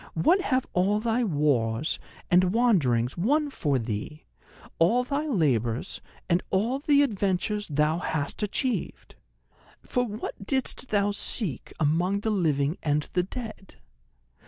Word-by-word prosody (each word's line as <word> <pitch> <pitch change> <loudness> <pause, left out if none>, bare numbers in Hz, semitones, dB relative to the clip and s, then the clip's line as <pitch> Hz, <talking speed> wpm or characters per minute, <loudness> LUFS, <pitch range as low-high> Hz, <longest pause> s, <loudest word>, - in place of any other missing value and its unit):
What 345 - +3
have 260 -6 0
all 195 +4 +2
thy 230 +2 0
wars 145 - +1 0.3
and 180 +1 +6
wanderings 135 - +2
won 290 - +2
for 145 - 0
thee, 115 +6 -5 0.5
all 230 +10 +4
thy 285 +4 -2
labours, 125 - 0 0.3
and 175 0 +2
all 225 +8 +1
the 285 0 +4
adventures 205 -3 -1
thou 150 +2 +1
hast 155 -2 -3
achieved? 235 +5 -2 0.7
For 250 - 0
what 215 -3 -6
didst 265 -1 0
thou 205 -1 +2
seek 200 - -2
among 175 +6 +1
the 220 - 0
living 155 -5 +1
and 150 -1 0
the 180 - +3
dead? 215 0 -8
190 Hz, 130 wpm, -27 LUFS, 150-235 Hz, 0.7 s, and